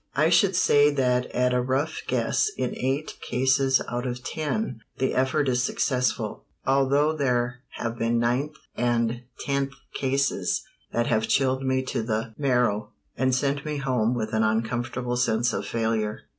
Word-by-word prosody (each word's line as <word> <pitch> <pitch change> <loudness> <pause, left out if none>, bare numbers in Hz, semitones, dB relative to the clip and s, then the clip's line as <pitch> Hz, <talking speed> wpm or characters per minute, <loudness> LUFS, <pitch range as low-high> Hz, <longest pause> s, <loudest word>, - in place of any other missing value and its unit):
I 155 +3 +4
should 185 +2 +4
say 145 -5 +5
that 125 -2 +2
at 125 0 +1
a 125 - +2
rough 135 +5 -1
guess 425 - +1
in - - -2
eight 135 +4 -2
cases 130 +1 +2
out 120 +1 -3
of 125 0 -4
ten 155 - -2 0.2
the 130 - 0
effort 130 +3 +1
is 125 -1 +2
successful, 125 0 -1 0.2
although 140 +3 +3
there 125 -4 0
have 115 0 -4
been 115 +1 +1
ninth 125 +6 0 0.2
and 120 0 0 0.2
tenth 140 -1 -1 0.2
cases 135 +1 0 0.3
that 120 0 +1
have 110 -2 +1
chilled 130 -1 +2
me 130 0 +1
to 130 - -2
the 110 0 -2
marrow, 125 -6 +1 0.2
and 130 0 +2
sent 140 +1 0
me 150 -1 -3
home 125 -4 +1
with 110 -1 -3
an 110 - +2
uncomfortable 120 +3 -1
sense 120 -1 +1
of - - -3
failure. 110 -2 -1
125 Hz, 155 wpm, -26 LUFS, 120-140 Hz, 0.3 s, say